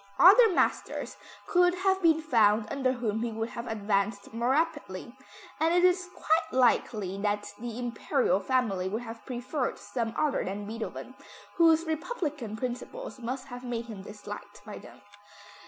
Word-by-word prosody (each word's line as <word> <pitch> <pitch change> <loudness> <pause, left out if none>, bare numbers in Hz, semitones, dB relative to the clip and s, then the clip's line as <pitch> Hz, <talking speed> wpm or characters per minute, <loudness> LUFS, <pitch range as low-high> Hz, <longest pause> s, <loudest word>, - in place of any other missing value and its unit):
Other 435 +6 +8
masters - - 0 0.3
could 355 0 +3
have 380 +1 +1
been 320 -2 +4
found 220 -7 +4
under 260 -2 +1
whom 225 -3 -2
he 235 0 -1
would 225 +1 -3
have 235 +1 -6
advanced 200 -1 -1
more 235 +2 0
rapidly, 280 - -1 0.4
and 325 +2 +3
it 355 - +4
is 365 0 +3
quite 320 +1 +1
likely 215 -6 +2
that 205 0 -1
the 235 0 -5
Imperial 245 - 0
family 195 -4 0
would 220 +5 -3
have 225 -1 -9
preferred 255 +2 -2
some 230 -3 -4
other 300 -2 +1
than 200 +2 -4
Beethoven, 225 +2 -6 0.4
whose 330 -1 +5
republican 305 - -3
principles 255 - -5
must 255 +3 -5
have 245 0 -8
made 235 -2 -3
him 215 -5 -8
disliked 205 0 -10
by 210 - -8
them. - - -14
245 Hz, 155 wpm, -29 LUFS, 215-310 Hz, 0.4 s, Other